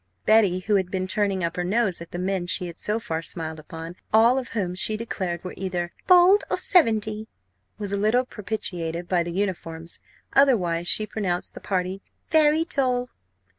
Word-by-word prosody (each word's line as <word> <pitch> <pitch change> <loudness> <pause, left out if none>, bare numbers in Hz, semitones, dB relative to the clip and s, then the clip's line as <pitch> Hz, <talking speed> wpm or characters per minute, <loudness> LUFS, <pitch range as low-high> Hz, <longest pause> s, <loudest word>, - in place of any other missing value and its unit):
Betty, 205 -4 +4
who 205 +2 +2
had 190 -2 -1
been 185 -1 -2
turning 195 -1 0
up 170 +1 -2
her 180 - 0
nose 195 -1 0
at 170 - -9
the 175 - -6
men 185 0 -2
she 180 +1 +1
had 170 -1 -8
so 210 +2 -1
far 165 -8 -3
smiled 160 -1 -3
upon, 165 +3 -9
all 230 +4 +5
of 255 - -6
whom 180 -4 -1
she 215 +4 0
declared 185 -6 -4
were 180 - -6
either 180 -2 -3
bald 365 +3 +6
or - - 0
seventy, 220 - +2 0.5
was 205 -2 -3
a 200 - 0
little 225 +5 +2
propitiated 180 -7 -4
by 180 -1 +2
the 170 0 -3
uniforms; 170 -3 -3 0.3
otherwise, 180 -12 +3
she 215 - +4
pronounced 185 -5 -3
the - - -9
party 185 0 -2 0.3
very 315 0 +4
dull. 255 -7 0
195 Hz, 180 wpm, -24 LUFS, 175-220 Hz, 0.5 s, bald